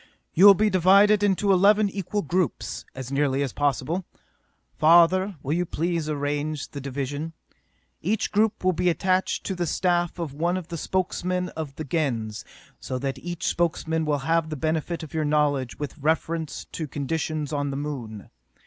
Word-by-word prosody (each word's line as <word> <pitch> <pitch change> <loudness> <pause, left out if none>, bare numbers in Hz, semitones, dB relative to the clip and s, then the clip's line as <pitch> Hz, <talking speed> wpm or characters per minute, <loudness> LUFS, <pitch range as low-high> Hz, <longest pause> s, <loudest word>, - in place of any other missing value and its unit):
"You 190 +5 +7
will 200 - +10
be 215 +3 +2
divided 200 +3 +5
into 200 0 +2
eleven 205 +3 +5
equal 200 +1 -3
groups, 175 -2 -2
as 130 -1 -7
nearly 140 -1 +1
as 135 - -4
possible. 145 +5 0 0.7
Father, 175 +4 +5
will 140 - -1
you 175 +2 +1
please 165 -1 -2
arrange 145 0 -2
the 140 - -7
division? 140 +4 -4 0.7
Each 205 +6 -1
group 215 0 +1
will 185 0 +3
be 180 +2 +1
attached 185 +2 0
to 195 - -3
the 175 -2 -2
staff 175 0 0
of 165 -5 -4
one 170 +5 0
of 180 -2 -7
the 170 - -4
Spokesman 180 +1 -1
of 155 -4 -6
the 155 - -5
Gens, 125 -9 -2 0.4
so 130 - -4
that 135 0 -3
each 175 +1 -5
Spokesman 160 -1 0
will 150 -1 +1
have 165 -1 +1
the 155 - -3
benefit 160 +3 -2
of 155 - -10
your 160 -1 0
knowledge 145 -4 +1
with 145 +2 -6
reference 160 +1 -1
to 160 - -4
conditions 150 +2 -3
on 145 -1 -1
the 135 - -3
Moon. 125 -8 -6
160 Hz, 170 wpm, -25 LUFS, 145-180 Hz, 0.7 s, will